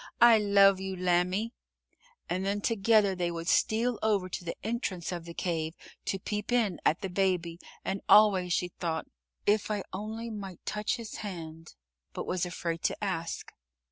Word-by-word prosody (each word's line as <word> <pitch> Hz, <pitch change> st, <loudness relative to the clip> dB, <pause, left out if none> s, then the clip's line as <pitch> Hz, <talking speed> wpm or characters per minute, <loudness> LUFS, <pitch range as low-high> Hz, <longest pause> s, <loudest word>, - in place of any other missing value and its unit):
I 235 Hz, -2 st, +8 dB
love 200 Hz, -2 st, +5 dB
you, 190 Hz, 0 st, -4 dB
lambie," 185 Hz, +5 st, +1 dB, 0.7 s
and 185 Hz, +2 st, -1 dB
then 200 Hz, +1 st, 0 dB
together 215 Hz, -2 st, +3 dB
they 180 Hz, -2 st, -1 dB
would 170 Hz, 0 st, -5 dB
steal 230 Hz, +4 st, +2 dB
over 200 Hz, -4 st, +1 dB
to 180 Hz, -, -5 dB
the 170 Hz, -, -4 dB
entrance 205 Hz, -6 st, -2 dB
of 175 Hz, -2 st, -5 dB
the 170 Hz, -, -8 dB
cave 160 Hz, -2 st, -2 dB, 0.3 s
to 195 Hz, -, -1 dB
peep 210 Hz, +3 st, -4 dB
in 225 Hz, -7 st, +2 dB
at 160 Hz, -, +2 dB
the 195 Hz, -, -2 dB, 0.2 s
Baby, 175 Hz, -3 st, 0 dB, 0.3 s
and 195 Hz, +1 st, -2 dB
always 195 Hz, -4 st, +6 dB
she 180 Hz, 0 st, +1 dB
thought, 165 Hz, -2 st, -3 dB, 0.4 s
"If 210 Hz, +1 st, +2 dB
I 205 Hz, -2 st, -1 dB
only 220 Hz, +4 st, -5 dB
might 195 Hz, -4 st, -8 dB
touch 210 Hz, 0 st, -1 dB
his 230 Hz, -3 st, -7 dB
hand," 165 Hz, -5 st, -7 dB, 0.4 s
but -, -, -4 dB
was 180 Hz, -1 st, -1 dB
afraid 170 Hz, -2 st, -3 dB
to -, -, -1 dB
ask. 170 Hz, -4 st, -3 dB
190 Hz, 170 wpm, -30 LUFS, 175-210 Hz, 0.7 s, I